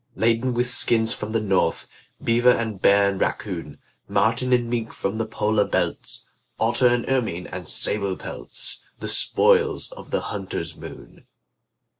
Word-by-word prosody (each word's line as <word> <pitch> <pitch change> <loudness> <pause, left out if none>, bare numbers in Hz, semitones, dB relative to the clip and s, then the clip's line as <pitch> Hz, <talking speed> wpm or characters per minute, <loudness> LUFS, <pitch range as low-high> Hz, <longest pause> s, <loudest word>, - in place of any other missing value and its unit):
Laden 115 +2 +1
with 120 +1 +2
skins 115 -2 +3
from 105 - -5
the 115 +1 0
north, 95 -5 0 0.4
Beaver 120 +2 +4
and 110 -5 +1
bear 100 0 +5
and 95 - -5
raccoon, 85 -8 -3 0.3
Marten 125 +3 +1
and 120 -1 +3
mink 115 -1 -3
from 100 +3 -3
the 110 - -1
polar 105 -1 +1
belts, - - -2 0.3
Otter 120 +3 +3
and 120 -1 +1
ermine 110 -10 -1
and 90 -4 -6
sable 100 -3 +1
pelts - - -8 0.2
The - - -5
spoils 460 -2 +3
of - - -11
the - - 0
hunter's - - -5
moon. - - -12
115 Hz, 150 wpm, -23 LUFS, 100-125 Hz, 0.4 s, bear